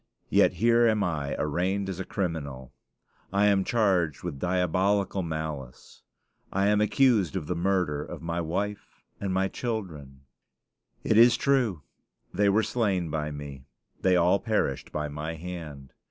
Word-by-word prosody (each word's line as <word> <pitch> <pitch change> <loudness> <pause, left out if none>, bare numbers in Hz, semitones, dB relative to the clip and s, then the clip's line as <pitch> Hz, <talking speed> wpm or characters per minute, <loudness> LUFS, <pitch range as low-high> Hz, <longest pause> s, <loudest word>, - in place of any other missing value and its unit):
Yet - - +4
here 115 +2 +4
am 110 -2 +2
I 75 -6 -2
arraigned 95 +6 -1
as 95 -2 -5
a - - -2
criminal. 70 -9 -4 0.6
I 100 +1 +3
am 100 -2 +3
charged 95 - +1
with 70 - -5
diabolical 95 +3 +1
malice; 80 -6 -6 0.5
I 100 +1 +2
am 105 0 +3
accused 105 - +3
of 90 -5 -2
the 90 - -2
murder 85 -5 0
of - - -8
my 85 +1 -2
wife 100 +5 -4 0.2
and 100 -1 -2
my 95 +1 +1
children! 85 - -5 0.8
It 110 - +3
is 120 0 +7
true, 125 - +1 0.5
they 100 +2 +3
were 110 +3 +3
slain 95 -10 0
by 75 -1 -2
me; 70 -2 -8 0.3
they 95 -1 +3
all 90 +3 +4
perished 105 - -1
by 75 0 -2
my 75 +3 -5
hand. 80 -5 -8
90 Hz, 150 wpm, -27 LUFS, 75-100 Hz, 0.8 s, is